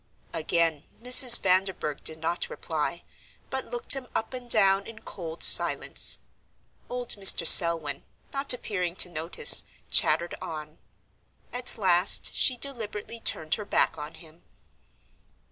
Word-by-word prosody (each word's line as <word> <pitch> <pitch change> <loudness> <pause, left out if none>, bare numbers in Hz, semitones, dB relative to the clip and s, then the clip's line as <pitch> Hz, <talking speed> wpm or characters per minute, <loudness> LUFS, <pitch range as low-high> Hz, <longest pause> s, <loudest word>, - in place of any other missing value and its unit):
Again 165 -2 -3
Mrs. 250 0 +6
Vanderburgh 185 -5 -3
did 160 - -5
not 165 +2 -5
reply, - - -7 0.5
but - - -7
looked 480 -1 +1
him 270 -2 -8
up 225 - -6
and 250 -1 -11
down 195 -3 +1
in 225 0 -15
cold 165 -3 -9
silence. - - +2 0.7
Old 245 -1 -8
Mr. 195 -4 +4
Selwyn, 165 -4 +5 0.3
not 275 0 +1
appearing 180 -8 -4
to 180 - 0
notice, 170 - +5 0.3
chattered 170 +1 +1
on. 155 -1 -11 0.7
At 245 -1 -4
last 185 -2 -1
she 255 - +1
deliberately 230 -4 -8
turned 155 -7 -4
her - - -10
back - - -1
on 150 +1 -11
him. 165 -1 -17
190 Hz, 130 wpm, -24 LUFS, 165-240 Hz, 0.7 s, Mrs